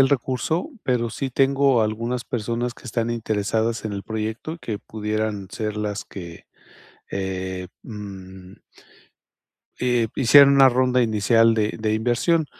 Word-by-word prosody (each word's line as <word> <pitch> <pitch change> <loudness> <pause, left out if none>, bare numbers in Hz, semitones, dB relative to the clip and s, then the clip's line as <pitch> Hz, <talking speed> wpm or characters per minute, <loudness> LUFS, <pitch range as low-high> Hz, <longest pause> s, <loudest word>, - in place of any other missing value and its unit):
el 135 - +6
recurso, 140 - -1
pero 120 -2 0
sí 135 +3 -4
tengo 135 -1 +3
algunas 115 +3 -2
personas 120 0 -2
que - - -18
están 115 -1 -2
interesadas 110 0 -1
en 110 - -3
el 100 -1 -4
proyecto, 110 +9 -4
que 105 -3 -4
pudieran 105 -2 -3
ser 105 0 -4
las 105 -1 -3
que, 85 -4 -10 0.6
eh, 95 -1 -4 0.2
mm 95 -4 -10 1.2
eh, 125 -2 +2
hicieran 140 +2 +7
una 135 -1 +7
ronda 125 0 +2
inicial 115 +1 +3
de 110 -1 0
de 110 0 0
inversión. 125 +9 +1
115 Hz, 135 wpm, -23 LUFS, 105-125 Hz, 1.2 s, hicieran